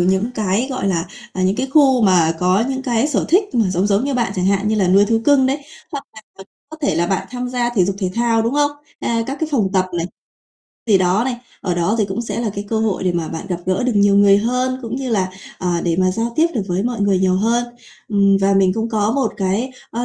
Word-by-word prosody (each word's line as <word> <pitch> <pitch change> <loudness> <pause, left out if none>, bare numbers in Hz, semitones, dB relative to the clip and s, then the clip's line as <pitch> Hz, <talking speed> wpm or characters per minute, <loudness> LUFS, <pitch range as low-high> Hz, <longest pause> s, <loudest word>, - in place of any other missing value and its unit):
những 190 +6 +1
cái, 215 +3 0
gọi 255 -6 -2
là, 170 -2 -1 0.3
à, 185 - -3
những 190 +2 +1
cái 265 - -1
khu 270 -3 +4
mà 175 -5 +4
có 185 +5 +2
những 265 -1 -3
cái 245 +1 0
sở 300 - 0
thích 390 0 +2
mà 225 -6 +2
giống 185 +2 +1
giống 205 +3 +1
như 280 -1 -1
bạn, 235 -5 0
chẳng 180 0 0
hạn 200 +1 +1
như 220 - +1
là 190 -4 +2
nuôi 195 +2 +5
thú 225 +2 +1
cưng 280 -3 +4
đấy, 270 +2 0 0.3
hoặc 280 -1 -5
là 220 - -11 0.2
có 195 - -10 0.2
có 315 - -10
thể 285 - +1
là 170 - +1
bạn 190 +1 -1
tham 250 0 -4
gia 245 -1 -1
thể 205 -7 +2
dục 195 +1 -2
thể 185 -3 -1
thao, 230 -1 +2
đúng 230 +4 -1
hông? 290 0 +2 0.3
À, 230 -1 0
các 275 - -4
cái 320 - -1
phòng 220 -8 +2
tập 190 -2 +2
này. 165 - -1 0.8
Thì, 205 -4 +4
đó, 185 +4 +2
này, 255 -1 -2 0.2
ở 180 -3 -2
đó 175 +5 0
thì 215 - +3
cũng 195 +3 -4
sẽ 230 - -4
là 230 -3 -1
cái 200 - -4
cơ 220 - 0
hội 210 -4 -1
để 180 - +1
mà 170 -2 -2
bạn 160 - -6
gặp 180 - -1
gỡ 185 +3 0
được 250 - +1
nhiều 200 -1 +4
người 200 0 +6
hơn, 250 +4 -1
cũng 230 +1 -4
như 265 -1 -4
là, 190 -4 +1 0.3
ờ, 185 - -2 0.2
để 170 -2 0
mà 185 0 +3
giao 230 +5 -2
tiếp 320 - +4
được 225 - 0
với 180 +2 0
mọi 240 -1 -2
người 200 -2 +2
nhiều 185 0 +2
hơn. 230 +4 +1 0.4
Ừm, 200 -2 +3
và 195 0 +3
mình 190 -1 +3
cũng 225 +1 -2
có 215 -1 0
một 265 -4 0
cái, 200 +7 -1 0.2
ơ, 235 +2 -3
210 Hz, 270 wpm, -19 LUFS, 190-245 Hz, 0.8 s, người